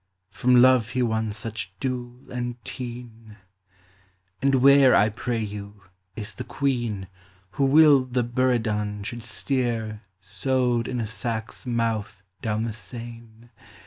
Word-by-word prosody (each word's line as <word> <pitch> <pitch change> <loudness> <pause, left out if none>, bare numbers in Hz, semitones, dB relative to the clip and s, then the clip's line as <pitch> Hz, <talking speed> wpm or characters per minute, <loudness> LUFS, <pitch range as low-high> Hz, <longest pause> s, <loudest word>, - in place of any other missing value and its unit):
(From 125 +5 +3
love 130 -4 +5
he 125 0 0
won 110 -2 0
such 105 -2 -6
dule 125 -1 -5
and 120 -1 -3
teen 120 -3 -8 0.5
!) 95 0 -36
And 135 +1 +3
where, 135 0 +6
I 105 +2 +5
pray 115 +1 -2
you, 100 -1 -8 0.3
is 105 -1 -5
the - - -6
Queen 120 -8 -2 0.4
Who 140 - +1
willed 135 -3 +5
that 120 -1 0
Buridan 110 -5 0
should 120 +3 -5
steer 115 -3 -2 0.2
Sewed 120 +5 0
in 125 -1 -3
a 115 - -1
sack's 110 +2 -4
mouth 110 -4 -2 0.2
down 110 -1 -1
the 115 -1 -3
Seine 115 0 -10
115 Hz, 135 wpm, -25 LUFS, 105-125 Hz, 0.5 s, where